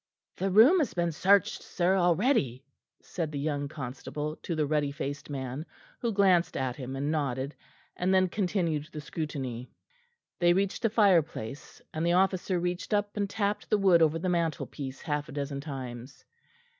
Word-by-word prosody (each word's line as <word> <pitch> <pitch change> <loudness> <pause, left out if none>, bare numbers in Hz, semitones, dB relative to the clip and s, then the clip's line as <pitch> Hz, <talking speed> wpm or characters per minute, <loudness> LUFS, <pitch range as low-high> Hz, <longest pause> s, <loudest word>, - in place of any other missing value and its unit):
"The 195 - 0
room 235 - +7
has 265 - -1
been 170 -1 +1
searched, 195 +6 +3
sir, 180 +1 +1
already," 175 - +2 0.4
said 165 -4 -4
the 145 - -4
young 145 0 -1
constable 145 +2 -5
to 170 - -4
the 155 -1 +1
ruddy 145 -1 0
faced 145 0 -5
man, 135 0 -4 0.4
who 235 - -1
glanced 190 -4 +3
at 130 -2 -1
him 130 -1 -6
and 140 +2 -1
nodded, 140 -2 -1 0.4
and 180 +1 0
then 185 -1 +4
continued 175 -6 -1
the 155 - -6
scrutiny. 135 -5 -5 0.7
They 175 0 +5
reached 195 +1 0
the 225 - +2
fireplace 165 - +1
and 155 - -2
the 170 +1 +2
officer 185 0 +2
reached 180 +4 -1
up 205 0 -1
and 205 -1 -1
tapped 205 0 -2
the 215 - +4
wood 190 -4 +5
over 160 0 +4
the 170 - -3
mantelpiece 160 -5 -2
half 150 -1 -2
a - - -9
dozen 140 -1 -3
times. 130 -3 -8
160 Hz, 170 wpm, -29 LUFS, 140-190 Hz, 0.7 s, room